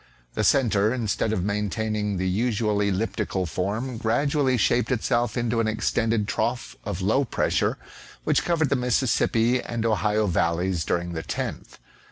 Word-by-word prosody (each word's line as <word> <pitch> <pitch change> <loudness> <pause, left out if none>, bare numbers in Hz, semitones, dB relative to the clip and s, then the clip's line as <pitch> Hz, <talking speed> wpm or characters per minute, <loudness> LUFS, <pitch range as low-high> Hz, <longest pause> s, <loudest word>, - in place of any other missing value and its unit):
The 110 - -1
centre 110 -4 +3
instead 115 -3 -1
of 95 -5 -1
maintaining 105 0 -1
the 95 +1 -1
usual 105 +1 0
elliptical 100 -1 -1
form, 105 +9 -3
gradually 135 +3 +1
shaped 120 +4 +2
itself 120 -1 0
into 120 -1 0
an 115 - +1
extended 110 0 0
trough 120 +4 -2
of 100 -3 -4
low 110 +8 +3
pressure, 130 - 0 0.5
which - - +2
covered 160 -4 +1
the 140 - +2
Mississippi 125 -1 +2
and 115 -1 -3
Ohio 105 0 +1
valleys 85 -1 0
during 85 0 -1
the 80 - -3
10th. - - -5
110 Hz, 145 wpm, -25 LUFS, 100-120 Hz, 0.5 s, centre